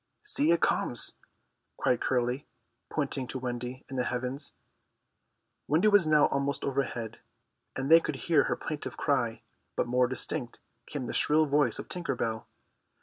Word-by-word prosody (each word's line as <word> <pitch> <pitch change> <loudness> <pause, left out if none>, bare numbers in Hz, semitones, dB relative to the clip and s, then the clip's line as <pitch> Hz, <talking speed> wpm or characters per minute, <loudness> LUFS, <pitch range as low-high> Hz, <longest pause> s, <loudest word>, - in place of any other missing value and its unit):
"See, 300 -9 +1
it 170 - +3
comes!" 120 - +1 0.6
cried 125 - +1
Curly, 125 +2 0 0.4
pointing 140 -3 -2
to 130 - -4
Wendy 125 0 -5
in 135 - -6
the 125 - +1
heavens. 130 +4 -3 1.1
Wendy 165 +9 +4
was 205 -5 +5
now 150 -1 +6
almost 140 +1 -1
overhead, 125 -5 -2 0.6
and 135 +3 -2
they 165 - +10
could 155 - -3
hear 150 +1 +3
her - - 0
plaintive 155 -2 -5
cry. 125 -6 0 0.3
But - - +1
more 125 +1 +3
distinct 125 -1 -3 0.3
came 145 -4 -4
the - - -4
shrill 155 +1 +4
voice 145 0 +2
of - - -6
Tinker 180 -2 -2
Bell. 110 -1 -2
135 Hz, 150 wpm, -29 LUFS, 125-150 Hz, 1.1 s, they